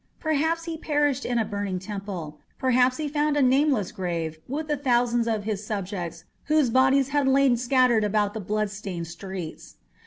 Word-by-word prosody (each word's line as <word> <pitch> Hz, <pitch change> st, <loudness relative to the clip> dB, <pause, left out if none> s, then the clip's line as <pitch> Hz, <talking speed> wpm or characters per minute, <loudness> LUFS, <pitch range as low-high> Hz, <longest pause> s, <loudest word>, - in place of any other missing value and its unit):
Perhaps 320 Hz, +2 st, 0 dB
he 330 Hz, -1 st, -5 dB
perished 290 Hz, -3 st, 0 dB
in 245 Hz, -, 0 dB
a 225 Hz, -, +1 dB
burning 200 Hz, -2 st, -3 dB
temple; 185 Hz, -6 st, -6 dB, 0.2 s
perhaps 255 Hz, 0 st, +3 dB
he 310 Hz, -, -2 dB
found 295 Hz, 0 st, 0 dB
a -, -, +3 dB
nameless 260 Hz, -6 st, +2 dB
grave 170 Hz, -5 st, -3 dB
with 300 Hz, +4 st, -3 dB
the 300 Hz, -, +1 dB
thousands 240 Hz, -3 st, +1 dB
of 220 Hz, -2 st, -1 dB
his 210 Hz, -1 st, -3 dB
subjects 185 Hz, -5 st, -4 dB, 0.2 s
whose 305 Hz, -5 st, +2 dB
bodies 265 Hz, +2 st, +4 dB
had 285 Hz, -1 st, +1 dB
lain 265 Hz, -1 st, +4 dB
scattered 245 Hz, -2 st, +3 dB
about 205 Hz, 0 st, +1 dB
the 220 Hz, -, -4 dB
blood 210 Hz, +1 st, -1 dB
stained 195 Hz, -4 st, -5 dB
streets. 175 Hz, -1 st, -8 dB
235 Hz, 175 wpm, -25 LUFS, 200-275 Hz, 0.2 s, bodies